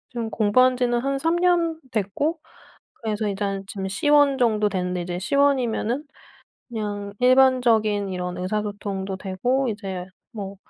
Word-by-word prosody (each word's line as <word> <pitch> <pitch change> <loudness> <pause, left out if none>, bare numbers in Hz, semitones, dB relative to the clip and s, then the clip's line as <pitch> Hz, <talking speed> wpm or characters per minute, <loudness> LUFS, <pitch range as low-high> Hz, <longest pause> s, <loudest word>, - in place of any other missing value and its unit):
지금 235 -3 -4
공부한 250 +4 +3
지는 240 -1 +1
한 275 +2 -1
3 330 +4 +1
년 345 -2 +2
됐고 230 - -1 0.6
그래서 215 -1 -2
일단 195 -1 -2
지금 195 -1 -5
C1 285 +7 +3
정도 215 -4 +2
됐는데 180 -2 -2
이제 175 0 -4
C1이면은 260 +1 +1 0.7
그냥 205 -3 -4
일반적인 245 -6 +4
이런 180 -1 -4
의사소통도 200 0 -3
되고 245 +8 -1
이제 195 -4 -5 0.3
뭐 200 -4 -6
215 Hz, 270 characters per minute, -23 LUFS, 195-255 Hz, 0.7 s, 일반적인